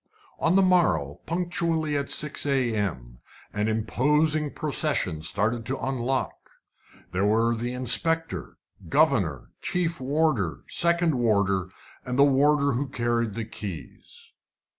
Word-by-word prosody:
On 165 +3 +2
the 195 - +5
morrow, 90 - +2
punctually 170 -3 -1
at 140 -1 -2
6 150 -1 0
a.m., 105 - -1 0.3
an 105 +1 -1
imposing 150 +7 +1
procession 145 - 0
started 110 +8 -1
to 135 +1 -1
unlock. 130 0 -2 0.8
There 95 +3 +1
were 115 +2 +2
the 120 +2 -4
inspector, 165 +6 0 0.3
governor, 130 - +1
chief 170 -2 -1
warder, 130 - 0
second 170 -1 +2
warder, 100 -5 +1 0.3
and 125 0 -4
the 140 - +6
warder 140 +1 +3
who 135 +3 -2
carried 120 -3 -1
the 115 - -3
keys. 95 - -9
130 Hz, 120 wpm, -26 LUFS, 105-155 Hz, 0.8 s, the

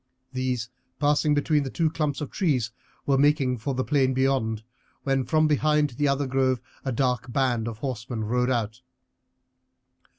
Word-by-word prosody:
These, 130 -3 -1 0.3
passing 150 0 +3
between 150 +1 +2
the 135 - -3
two 160 +3 0
clumps 150 -2 -1
of 145 - -5
trees, 130 - 0 0.3
were 135 -1 +2
making 140 -4 +3
for 135 +4 -2
the 130 - 0
plain 130 -3 +2
beyond, 130 -5 +1 0.4
when 135 -2 +1
from 155 +6 +3
behind 150 -1 +2
the 145 +5 0
other 140 +1 +1
grove 130 -1 +1 0.2
a 135 - -2
dark 125 0 0
band 120 -4 +1
of 115 -2 -5
horsemen 120 -2 -4
rode 125 +3 +1
out. 115 -1 -1
130 Hz, 160 wpm, -26 LUFS, 125-145 Hz, 0.4 s, passing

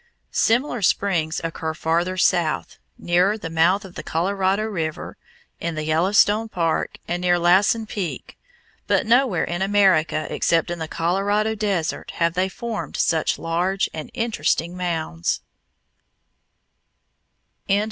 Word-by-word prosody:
Similar 240 +1 +1
springs 175 -4 +1
occur 160 -1 -3
farther 170 +4 0
south, 170 -3 +1 0.2
nearer 180 +5 +2
the 165 -6 -7
mouth 180 +5 +2
of 185 - -11
the - - -6
Colorado 190 +4 0
River, 165 -8 -4 0.4
in 170 -1 -3
the 155 - -3
Yellowstone 205 +7 +3
Park, 165 -5 -1
and 175 +1 -2
near 175 -1 +3
Lassen 190 +6 +3
Peak, 195 -5 -5 0.5
but - - +2
nowhere 235 -5 +3
in 175 +1 -3
America 190 -6 +3
except 165 +1 +1
in 175 - -4
the 160 - -4
Colorado 200 +7 0
desert 200 -7 -2
have 170 -1 +1
they 185 +2 0
formed 230 +3 -5
such 160 -2 +1
large 175 +4 -1
and 155 -1 -6
interesting 220 -7 -1
mounds. 160 - -2
180 Hz, 125 wpm, -22 LUFS, 165-205 Hz, 0.5 s, Yellowstone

